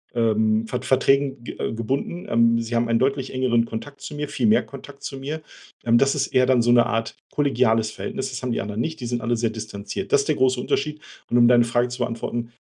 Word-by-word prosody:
ähm, 110 -1 +2
Ver 125 +2 -4
Verträgen 135 0 +2
ge - - -8
äh, - - -2
gebunden, 135 +10 -3
ähm. 115 0 +4
Sie 115 +1 -4
haben 115 0 +2
einen 115 0 +2
deutlich 135 0 0
engeren 125 -3 +2
Kontakt 140 +5 -7
zu - - -7
mir. 145 0 -4
Viel - - 0
mehr 215 +1 +4
Kontakt 140 0 -12
zu 135 - -5
mir. 150 +4 -5 0.4
Ähm, 120 0 +4
das 135 0 +3
ist - - 0
eher 130 0 +3
dann 130 -2 +4
so 120 - +3
'ne 120 -1 +6
Art 115 -1 -2
kollegiales 115 -6 +2
Verhältnis. 200 - -4
Das - - -5
haben 125 -1 -2
die - - -1
anderen 105 +2 -5
nicht. 160 +2 -3
Die 120 - -4
sind 120 0 -1
alle 120 +1 0
sehr 115 0 0
distanziert. 105 -2 -6
Das 140 - +6
ist 140 - -6
der 150 - +2
große 130 -1 +2
Unterschied. 150 +3 -2 0.3
Und 120 - +2
um 120 - +6
deine 120 -1 +5
Frage 120 +1 +1
zu 125 - -6
beantworten, 120 0 -3
120 Hz, 240 wpm, -23 LUFS, 115-135 Hz, 0.4 s, ne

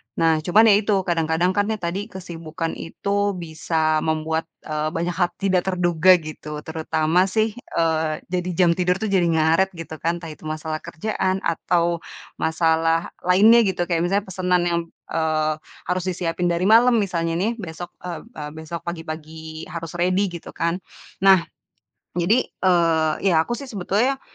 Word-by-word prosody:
Nah, 165 -1 +3
cuman 185 +8 +4
ya, 200 - +7
itu, 210 -1 +1
kadang-kadang 165 +1 +1
kan, 205 +2 +1
ya 220 - 0
tadi, 185 +4 -2
kesibukan 165 -4 -5
itu 200 +4 -1
bisa 160 -1 0
membuat, 160 +1 -1 0.2
eee, 155 0 -1
banyak 170 +2 -1
hal 175 -1 +2
tidak 190 -2 +2
terduga, 180 -1 +4
gitu, 150 -1 -7
terutama 160 +2 +1
sih, 220 +2 +1 0.2
eee, 160 -1 +1
jadi, 180 0 -2
jam 175 -1 +4
tidur 180 0 +2
tuh 220 - -1
jadi 185 -3 +3
ngaret, 165 +3 +2
gitu 165 -1 -7
kan. 170 +1 0
Entah, 165 - -7
itu 155 - -13
masalah 155 0 -3
kerjaan, 190 +2 -2
atau 170 0 +1 0.4
masalah 165 +1 +1 0.2
lainnya 215 +6 +7
gitu, 185 -2 0
kayak 170 -1 +1
misalnya, 200 +3 +1
pesanan 180 -1 +1
yang, 170 -1 +1 0.3
eee, 155 -1 +1 0.3
harus 180 0 -1
disiapin 175 -1 -1
dari 170 +1 0
malam 230 +5 +6
misalnya 170 -6 0
nih, 200 +6 +1
besok, 175 -1 -7
eee 175 -2 -6
eee, 150 -11 -8
besok 160 +2 -7
pagi-pagi 160 -1 -7
harus 165 0 -6
ready, 185 +2 +2
gitu 170 - -9
kan. 170 +2 -1 0.4
Nah, 190 -2 +6 0.7
jadi, 190 +9 +2
eee, 165 -4 +2
iya, 170 -5 +4
aku 240 +9 -2
sih 280 - -7
sebetulnya 240 +4 0
170 Hz, 160 wpm, -22 LUFS, 160-185 Hz, 0.7 s, ya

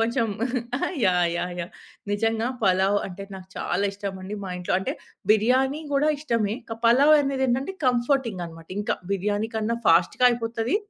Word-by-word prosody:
కొంచెం 230 +1 +1 0.8
yeah! 180 -2 +3
Yeah! 180 +1 -2
Yeah! 170 - -6 0.4
నిజంగా 225 +2 0 0.2
పలావు 190 +1 +3
అంటే 195 +1 -8
నాకు 185 0 -12
చాలా 190 +3 -1
ఇష్టమండి. 195 0 -6
మా 190 - -5
ఇంట్లో 180 0 -1
అంటే - - -2 0.4
బిర్యానీ 260 +7 +2
గూడా 280 +2 +3
ఇష్టమే 230 -8 0 0.2
క 225 - -5
పలావనేదేంటంటే, 275 +2 +3
కంఫర్‌టింగన్నమాట 230 - -1
ఇంకా 210 - -1 0.2
బిర్యానీ 205 +3 -1
కన్నా 220 +2 0
ఫాస్ట్‌గా 170 +9 +4
అయిపోతది. 230 - -1
225 Hz, 130 wpm, -25 LUFS, 190-250 Hz, 0.8 s, ఫాస్ట్‌గా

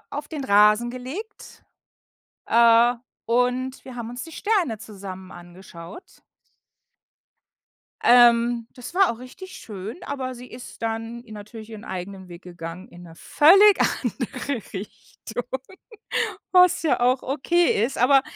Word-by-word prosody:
auf 290 +1 -5
den 300 -3 -6
Rasen 210 +2 +4
gelegt, 280 - -9 0.8
äh, 235 +1 +5 0.3
und 250 +2 0
wir 255 -2 -9
haben 235 -1 -6
uns 245 +1 -7
die 325 - -12
Sterne 360 - 0
zusammen 190 -3 -10
angeschaut. 175 - -13 1.8
Ähm, 235 -1 +5
das 250 +6 -10
war 380 -7 +4
auch 225 - -11
richtig 370 +9 -11
schön, 205 0 -8
aber 260 -2 -4
sie 245 +1 -11
ist 245 -1 -11
dann 225 +1 -4
natürlich 215 +1 -10
ihren 220 +1 -9
eigenen 190 0 -7
Weg 175 +1 -11
gegangen, 175 +1 -9
in 175 0 -14
'ne 165 - -13
völlig 390 - +6 0.2
andere 250 +1 -3
Richtung, 220 +4 -8 1.1
was 360 -2 +5
ja 315 - +1
auch 250 +2 +2
okay 300 -1 +1
ist. 255 - -3
Aber 265 +2 +5
240 Hz, 130 wpm, -23 LUFS, 210-265 Hz, 1.8 s, völlig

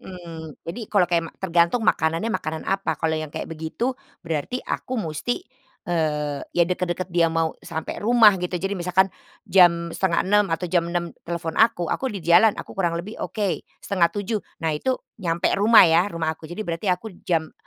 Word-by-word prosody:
Mhm, 165 -4 -9
jadi, 170 +9 -6
kalau 200 -4 +4
kayak 170 -1 +1
ma - - -15
tergantung 175 +5 +2
makanannya 165 +8 +1
makanan 160 -5 -3
apa, 195 -5 -1
kalau 160 -1 0
yang 155 -1 -2
kayak - - -5
begitu 165 +11 -3 0.3
berarti 165 - -2
aku 255 - -3
musti, 170 +4 -3 0.4
eee, 150 -4 -1 0.2
ya 170 - +5
dekat-dekat 180 0 -2
dia 170 -1 +4
mau 165 -1 0
sampai 160 -1 -5
rumah, 225 -1 +6
gitu, 180 0 -2
jadi 195 +3 -2
misalkan 185 0 +1 0.3
jam 170 -2 +4
5:30 195 +3 +2
atau 165 +2 -2
jam 170 -1 +1
6:00 170 -1 -2 0.2
telepon 170 -1 -3
aku, 220 -7 +3
"Aku 265 - -1
di 200 -8 -6
jalan," 175 +6 +5
aku - - -8
kurang 170 -3 0
lebih 190 +6 -6
oke, 205 -4 -2 0.2
6:30. 200 +3 0 0.2
Nah, 160 - +2
itu 255 +13 0 0.2
nyampe 170 -1 0
rumah 220 +2 +8
ya, 170 +3 +4
rumah 165 -4 -2
aku, 160 0 -12
jadi 195 +5 -5
berarti 170 +3 -3
aku 185 +3 -1
jam 160 -3 -1
175 Hz, 175 wpm, -23 LUFS, 165-195 Hz, 0.4 s, rumah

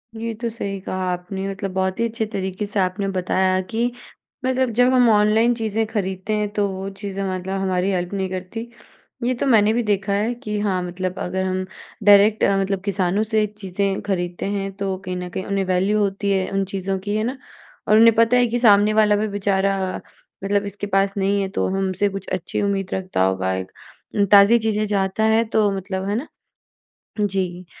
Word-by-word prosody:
ये 225 +1 -4
तो 235 - -1
सही 200 -4 -5
कहा 185 - -5 0.2
आपने 190 +2 -4
मतलब 195 0 -4
बहुत 190 +2 -1
ही 230 - +2
अच्छे 225 0 -3
तरीके 190 +1 -3
से 205 0 -3
आपने 185 +2 0
बताया 185 0 +1
कि 235 +2 0 0.5
मतलब 260 0 +1
जब 250 +1 +5
हम 245 -2 +5
ऑनलाइन 215 +2 +4
चीज़ें 220 -1 -1
खरीदते 195 -1 -3
हैं 210 -1 -1
तो 205 -1 +1
वो 190 0 -5
चीज़ें 195 -1 -4
मतलब 185 +1 -3
हमारी 185 0 0
हेल्प 180 0 -2
नहीं 190 -1 -2
करती। 185 +6 -5 0.6
ये 250 - +1
तो 245 - -2
मैंने 220 -3 +4
भी 240 - +1
देखा 200 -2 0
है 215 +4 0
कि 210 -2 -2
हाँ 195 -3 0
मतलब 185 +1 -4
अगर 190 +1 -2
हम 185 0 -1 0.4
डायरेक्ट 205 +1 +6
अ, 195 - +3
मतलब 195 -1 -1
किसानों 195 +1 +1
से 215 -1 +1
चीज़ें 195 -1 -3
खरीदते 180 -3 -3
हैं 195 0 -2
तो 195 -1 -2
कहीं 185 - -3
न 180 0 -5
कहीं 185 - -5
उन्हें 195 -1 -1
वैल्यू 190 +3 +1
होती 200 0 0
है 190 -1 0
उन 195 0 0
चीज़ों 195 0 -3
की। 205 +2 -3
है 215 - 0
न? 255 +3 -3 0.5
और 215 - +5
उन्हें 230 +1 +7
पता 230 +2 +4
है 245 - +4
कि 240 +1 -1
सामने 210 -2 +5
वाला 215 -1 +4
भी 210 +1 0
बेचारा 195 -1 0 0.5
मतलब 200 +1 +1
इसके 205 0 -5
पास 195 0 +1
नहीं 200 +1 +1
है 195 - -2
तो - - +1
हमसे 195 +1 0
कुछ 195 -1 -7
अच्छी 185 +1 -2
उम्मीद 195 -2 -1
रखता 185 - -1
होगा 95 0 0
एक। 95 0 -5 0.6
ताज़ी 205 +3 +8
चीज़ें 215 -1 0
चाहता 200 0 0
है 220 +1 +4
तो 215 -2 +4
मतलब 190 0 -4
है 205 - 0
न? - - -15 0.9
जी 185 -3 -2
200 Hz, 200 wpm, -21 LUFS, 190-215 Hz, 0.9 s, ताज़ी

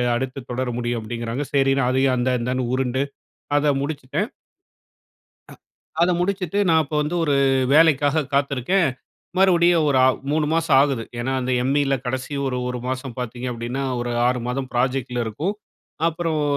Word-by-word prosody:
அடுத்து 130 +2 -3
தொடர 130 +1 -2
முடியும். 120 -1 -2
அப்டிங்கிறாங்க. 120 +4 -4
சரின்னு 135 -1 +3
அதையும் 130 0 +2
அந்த 125 +1 +1
அந்தான்னு 125 +1 -1
உருண்டு, 130 +1 0 0.5
அத 145 -1 +3
முடிச்சிட்டேன். 140 -3 -3 1.2
அ - - -10 0.5
அத 180 - +4
முடிச்சுட்டு, 190 0 -1
நான் 160 -1 +5
அப்பவந்து 150 +2 -2
ஒரு 145 -2 +2 0.4
வேலைக்காக 155 -1 +4
காத்துருக்கேன். 140 +5 +2 0.5
மறுபடியும் 175 -4 +4
ஒரு 135 -2 +3
ஆ - - +6 0.2
3 150 0 +1
மாசம் 165 -4 +3
ஆகுது. 135 -5 0 0.2
ஏன்னா, 130 +2 -2
அந்த 130 0 -2
எம்இல 140 +1 +2
கடைசி 130 +3 -3
ஒரு 125 -1 -1
ஒரு 125 - -3
மாசம் 130 -1 -4
பார்த்தீங்க 125 +1 -5
அப்டின்னா, 120 +4 -4 0.2
ஒரு 120 0 -3 0.2
6 125 0 +1
மாதம் 130 +1 -3
ப்ராஜெக்ட்ல 125 -1 0
இருக்கும். 160 - -2 0.5
அப்புறம் 165 -2 -1
135 Hz, 145 wpm, -22 LUFS, 125-150 Hz, 1.2 s, ஆ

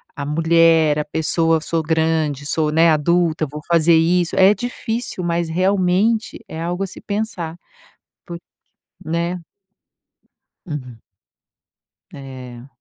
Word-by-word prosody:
a 140 - -5
mulher, 165 0 +3
a 150 - -2
pessoa, 160 +1 0
sou 165 0 -1
grande, 160 -2 0
sou, 150 +1 0
né, 165 +2 +4
adulta, 160 +1 +1
vou 150 +1 -8
fazer 170 -1 +4
isso. 170 +1 +2
É 190 +2 +6
difícil, 230 -2 -4
mas 170 0 -1
realmente 190 +6 +1
é 160 - -7
algo 175 +3 -2
a 195 - -3
se - - -11
pensar, 200 -6 -4 0.7
porque, 170 0 -8 0.6
né? 170 +2 -2 1.2
Uhum. 130 - -7 1.1
É. 130 -2 -10
165 Hz, 115 wpm, -20 LUFS, 155-180 Hz, 1.2 s, É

